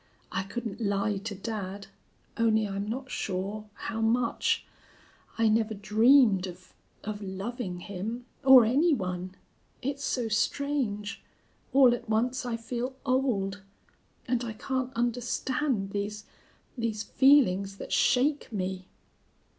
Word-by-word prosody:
I 185 - -1
couldn't 225 +3 -5
lie 200 0 0
to 200 +1 -5
dad. 200 -1 -5 0.5
Only 220 -2 +2
I'm 200 +1 -4
not 260 +3 -5
sure 205 +3 -3
how 225 - -4
much. 230 +1 +1 0.7
I 225 0 +3
never 220 0 +2
dreamed 210 -1 +4
of 180 0 -12 0.3
of 210 0 -5
loving 195 -1 -5
him, 215 +6 -5 0.2
or 265 -3 +9
any 290 +8 +3
one. 185 -3 -4 0.5
It's 280 +2 -3
so 245 -3 -1
strange. 225 -2 -1 0.5
All 260 -3 +6
at 240 - -5
once 245 +4 0
I 230 -1 -1
feel 245 +3 -4
old. 225 -7 0 0.7
And 245 -1 0
I 230 -2 -4
can't 260 +3 -2
understand 245 -1 -1
these 205 +1 -4 0.5
these 225 -4 -2
feelings 205 -7 +4
that - - -6
shake 280 +2 +2
me." 185 -2 -3
220 Hz, 125 wpm, -28 LUFS, 200-250 Hz, 0.7 s, or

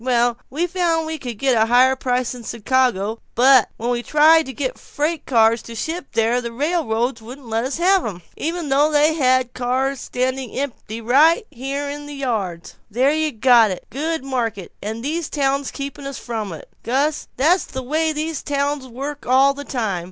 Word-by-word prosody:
Well, 240 -1 +1
we 315 +6 -1
found 340 -3 0
we 315 0 -4
could 245 -5 -6
get 235 -3 +2
higher 255 +2 +5
prices 250 -1 -1
in 245 -1 -10 0.2
Chicago, 225 -3 +1 0.2
but 255 -1 +6
when 235 +2 -2
we 240 -1 0
tried 310 +4 +5
to - - -5
get 260 +1 -4
freight 305 +2 -3
cars 230 -2 +4
to 230 +1 -10
ship 320 +5 -4
there, 230 +2 +2
the 235 -1 -5
railroads 255 -4 -1
wouldn't 250 +4 -11
let 225 +1 -1
us 270 - -3
have 370 +2 +3
'em 180 -5 -6
even 330 -1 -3
though 290 +3 +3
they 300 +1 +4
had 255 -4 +2
cars 260 +2 -1
standing 255 -1 -2
empty 230 -5 -5
right 295 - +4
here 275 +3 -4
in 290 +1 -6
the 290 - -8
yards. 210 -11 -3
There 255 +7 +2
you 310 0 0
got 235 -2 +5
it 185 - -5
good 315 +3 -2
market, 230 -8 -3
and 220 +3 -5
these 320 +2 -2
towns 275 -1 0
keeping 280 0 -6
us 275 - -6
from 220 -5 -4
it. 160 - -9
Gus, 280 +5 0
that's 330 +8 +3
the 260 - -6
way 315 +5 0
these 310 0 -3
towns 285 -1 -2
work 275 +4 -6
all 265 +2 +5
the 285 +1 -7
time. 235 -7 -2
265 Hz, 190 wpm, -21 LUFS, 235-295 Hz, 0.2 s, but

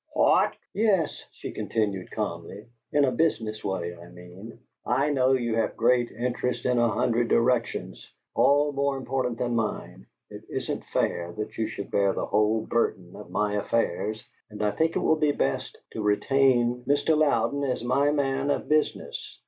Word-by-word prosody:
"What!" - - +3 0.2
"Yes," 200 -7 +1
she - - -8
continued, 100 -4 -2
calmly, 100 0 -5 0.3
"in 145 -1 +4
a 130 - +1
business 110 -10 0
way 85 -3 -3
I 85 0 -13
mean. 90 +5 -12 0.3
I 135 +4 +1
know 130 -2 +3
you 120 -3 0
have 115 - -1
great 120 +1 +3
interests 125 +1 -2
in 125 -1 +2
a 120 0 +3
hundred 115 +2 +1
directions, 115 -1 0 0.2
all 145 +1 +4
more 140 0 0
important 130 -2 -2
than 120 0 -1
mine; 115 -2 -3 0.2
it - - -9
isn't - - -4
fair 85 0 -1
that 105 +4 -6
you 110 - -1
should 105 -2 -7
bear 100 -1 +2
the - - -2
whole 105 +1 +1
burden 95 -6 -1
of 105 - -10
my 105 0 0
affairs, 105 0 -1 0.2
and 105 0 -5
I 105 - +2
think 160 +6 0
it - - +2
will 160 - +3
be 150 -2 +2
best 70 - -2
to 110 - -5
retain 120 +3 +2
Mr. 145 +3 +3
Louden 145 -2 +2
as 130 -4 -1
my 135 +4 +2
man 140 -1 0
of - - -1
business. 155 0 -1
120 Hz, 170 wpm, -26 LUFS, 105-135 Hz, 0.3 s, in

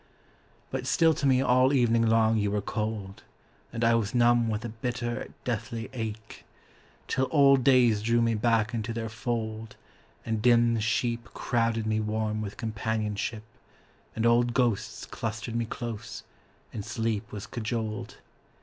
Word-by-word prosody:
But 130 -1 -3
still 160 +3 +4
to 140 - -1
me 130 0 +4
all 130 +2 +4
evening 115 -3 +3
long 110 0 +3
you 105 -1 +1
were 105 +1 0
cold, 105 -2 -4 0.5
And 115 0 -3
I 115 0 +5
was 115 0 0
numb 120 -1 +4
with 110 +1 -2
a - - -3
bitter, 120 +2 -4
deathly 115 -1 -4
ache; 110 -3 -6 0.6
Till 130 0 0
old 140 -3 +5
days 120 -5 +4
drew 115 +2 +2
me 115 -1 +2
back 110 0 +1
into 115 0 -3
their 115 -1 -4
fold, 110 -2 -4 0.5
And 110 -2 -1
dim 120 -1 +4
sheep 115 +2 0
crowded 115 -2 0
me 110 0 +1
warm 110 0 -1
with 100 -2 -6
companionship, 110 -1 -3 0.7
And 110 - -1
old 120 0 +3
ghosts 120 -6 0
clustered 115 +1 -5
me 115 0 0
close, 115 -1 -6 0.5
and 105 - -4
sleep 110 -1 -2
was 105 -2 -6
cajoled. 110 -2 -4
115 Hz, 150 wpm, -28 LUFS, 110-120 Hz, 0.7 s, I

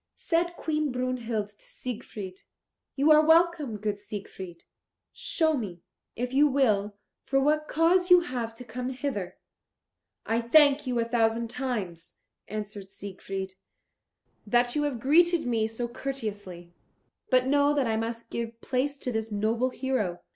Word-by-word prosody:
Said 345 +1 0
Queen 305 -2 -1
Brunhild 245 -4 -2
to 205 - -23
Siegfried, 205 -6 -7 0.5
"You 290 +3 +4
are 305 0 +7
welcome, 320 -7 +3
good 205 0 -2
Sir 205 - -15
Siegfried. 190 -4 -8 0.5
Show 320 -2 +1
me, 185 -9 -5 0.3
if 250 +2 -3
you 290 +2 +5
will, 215 -7 +2 0.3
for 270 - +1
what 305 +2 +2
cause 355 +3 +3
you 360 0 +8
have 240 -8 -4
come 250 +3 -4
hither." 255 -8 -4 0.9
"I 225 +1 +1
thank 285 +3 +5
you 250 -1 0
a 230 - +1
thousand 230 0 +1
times," 210 -10 -4 0.3
answered 205 -2 -6
Siegfried, 195 -1 -6 0.9
"that 240 +2 +2
you 295 - +2
have 270 -5 -2
greeted 335 +6 +4
me 225 -3 +1
so 225 +2 -3
courteously, 205 -9 -6 0.6
but 255 -1 +4
know 285 +2 +3
that 280 -3 +2
I 225 -1 0
must 230 +1 -4
give 230 0 -4
place 270 +4 -1
to 255 - -4
this 220 -1 -3
noble 225 +5 +1
hero. 250 -9 -2
240 Hz, 145 wpm, -28 LUFS, 210-280 Hz, 0.9 s, you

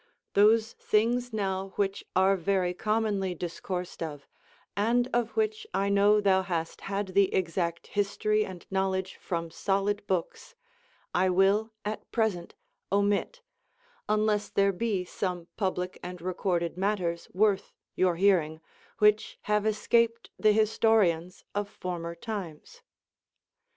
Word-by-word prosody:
Those 220 +3 +4
things 240 +3 +1
now 195 -2 -2
which 200 -1 -1
are 190 +1 +4
very 185 -1 0
commonly 210 -2 0
discoursed 180 +1 -5
of, 150 -4 -5 0.5
and 235 +4 +2
of 240 - 0
which 435 0 0
I 200 +1 +1
know 200 +1 +5
thou 195 -2 +3
hast 170 -3 -3
had 200 0 -2
the 195 +1 +3
exact 170 -1 -1
history 210 +1 0
and 185 -4 -8
knowledge 190 0 -1
froni 170 -2 -3
solid 200 +1 0
books, 185 - -3 0.6
I 185 - +3
will 195 +4 +3
at 215 +1 -5
present 215 -7 -1 0.4
omit, 205 - +1 0.7
unless 210 -1 +1
there 200 0 +2
be 195 -2 -1
some 180 -2 -4
public 185 -3 -2
and 180 0 -7
recorded 175 -1 -1
matters 185 -4 -1
worth 200 +1 +1 0.2
your 185 -2 +2
hearing, 165 -4 +2 0.4
which 210 0 +3
have 210 0 +1
escaped 230 +2 +1
the 215 - +4
historians 210 -5 +2
of 205 0 -2
former 175 -4 -5
times. 200 - -7
195 Hz, 125 wpm, -28 LUFS, 180-215 Hz, 0.7 s, know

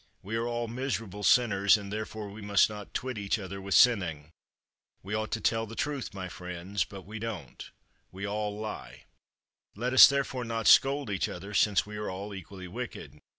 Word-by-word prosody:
We 105 +4 -4
are 115 +1 -1
all 120 0 -2
miserable 115 -5 -4
sinners, 100 -3 +4
and 100 -1 -7
therefore 110 0 -5
we 105 +2 -10
must 100 0 +4
not 105 -2 -8
twit 130 -4 -3
each 100 +2 0
other 100 -1 -7
with 95 0 -1
sinning. 85 -11 +3 0.7
We 100 +3 -6
ought 110 0 -1
to - - -1
tell 115 0 0
the 115 - -9
truth, 140 +3 -3
my 95 -2 -6
friends. 90 +2 -4
But 95 -2 -10
we 105 +4 -8
don't. 110 -5 -6 0.4
We 95 +2 -6
all 105 0 -2
lie. 110 0 -7 0.7
Let 125 +5 -2
us 130 - +11
therefore 135 -2 -1
not 115 -1 -3
scold 135 -4 +5
each 95 - -1
other, 100 +4 -8
since 105 -1 +3
we 105 0 -8
are 105 - -3
all 100 +2 -6
equally 95 0 -9
wicked. 90 - -7
105 Hz, 190 wpm, -29 LUFS, 100-115 Hz, 0.7 s, us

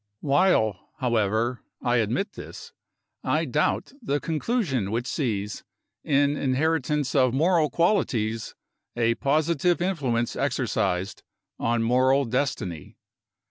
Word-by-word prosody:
While, 140 - +2
however, 120 -2 0 0.2
I 120 0 +1
admit 120 - 0
this, - - -10 0.5
I - - +1
doubt - - 0
the 145 - -1
conclusion 160 - -1
which 115 +3 -2
sees, 105 -8 -2 0.4
in 145 0 +2
inheritance 145 0 0
of 130 -3 +3
moral 160 +1 +3
qualities, 120 - 0 0.4
a 115 -1 +2
positive 155 +6 +1
influence 135 -11 -1
exercised 90 +4 -1 0.4
on 115 0 +1
moral 130 +4 +3
destiny. 115 - -3
130 Hz, 100 wpm, -25 LUFS, 115-155 Hz, 0.5 s, of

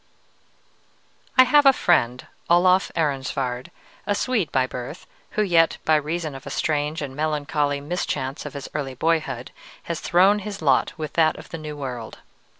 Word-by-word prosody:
I 255 - +10
have 290 +2 +5
a - - +10
friend, 130 - +1 0.2
Olof 180 +2 +4
Ehrensvärd, 135 -4 -1 0.4
a 205 - +1
Swede 215 - 0
by 130 -1 +2
birth, 125 +5 -7 0.3
who 215 - +4
yet, 165 -4 +3
by 155 - +4
reason 155 +1 -2
of 135 +1 -10
a - - -4
strange 150 0 -1
and 135 -2 -6
melancholy 150 -1 -1
mischance 145 -4 -3
of 150 -1 -8
his 140 - -6
early 135 -3 -3
boyhood, 135 -4 -1 0.3
has 170 -2 -4
thrown 195 +4 +4
his 200 0 -6
lot 140 -5 +2
with 155 -2 -5
that 160 -2 +3
of - - -12
the 165 - -6
New 150 -1 -7
World. 125 -5 -6
150 Hz, 160 wpm, -23 LUFS, 135-175 Hz, 0.4 s, I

